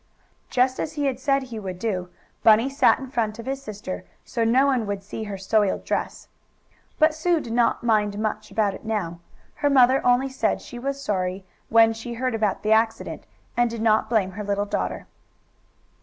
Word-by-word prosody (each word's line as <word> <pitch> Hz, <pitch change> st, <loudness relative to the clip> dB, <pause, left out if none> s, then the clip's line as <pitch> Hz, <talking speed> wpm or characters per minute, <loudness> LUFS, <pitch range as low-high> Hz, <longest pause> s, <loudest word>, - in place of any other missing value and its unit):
Just 255 Hz, +1 st, +2 dB
as 300 Hz, -, -3 dB
he 290 Hz, -2 st, -2 dB
had 265 Hz, -2 st, -1 dB
said 275 Hz, 0 st, +1 dB
he 240 Hz, -4 st, -7 dB
would 190 Hz, -3 st, -6 dB
do, 185 Hz, -3 st, -2 dB, 0.3 s
Bunny 225 Hz, +5 st, +5 dB
sat 275 Hz, -, +4 dB
in 265 Hz, -, -7 dB
front 220 Hz, -4 st, -1 dB
of 230 Hz, -, -8 dB
his 270 Hz, +1 st, -3 dB
sister, 205 Hz, -6 st, -6 dB, 0.2 s
so 230 Hz, -, -1 dB
no 250 Hz, +4 st, +4 dB
one 255 Hz, -6 st, +1 dB
would 200 Hz, -1 st, -3 dB
see 215 Hz, +2 st, -6 dB
her 200 Hz, -2 st, -5 dB
soiled 200 Hz, +1 st, +1 dB
dress. -, -, -3 dB, 0.7 s
But 310 Hz, 0 st, +4 dB
Sue 330 Hz, +2 st, +1 dB
did 230 Hz, -6 st, -6 dB
not 235 Hz, -1 st, +2 dB
much 210 Hz, -3 st, +1 dB
mind 215 Hz, 0 st, -3 dB
about 210 Hz, -3 st, +1 dB
it -, -, -10 dB
now. 205 Hz, -7 st, -3 dB, 0.4 s
Her 290 Hz, -, +1 dB
mother 260 Hz, -1 st, +5 dB
only 250 Hz, +2 st, +3 dB
said 265 Hz, 0 st, 0 dB
she 240 Hz, -, -9 dB
was 275 Hz, +2 st, -3 dB
sorry, 190 Hz, -5 st, -2 dB, 0.2 s
when 225 Hz, 0 st, +5 dB
she 230 Hz, +1 st, -7 dB
heard 255 Hz, +1 st, -1 dB
about 215 Hz, -3 st, -1 dB
the 215 Hz, -, 0 dB
accident, 225 Hz, +1 st, +1 dB, 0.3 s
and 240 Hz, -1 st, +3 dB
did 230 Hz, -1 st, -4 dB
not 220 Hz, -1 st, +3 dB
blame 210 Hz, -5 st, +1 dB
her 210 Hz, +3 st, -6 dB
little 200 Hz, 0 st, -1 dB
daughter. 200 Hz, -, -3 dB
225 Hz, 195 wpm, -24 LUFS, 210-260 Hz, 0.7 s, Bunny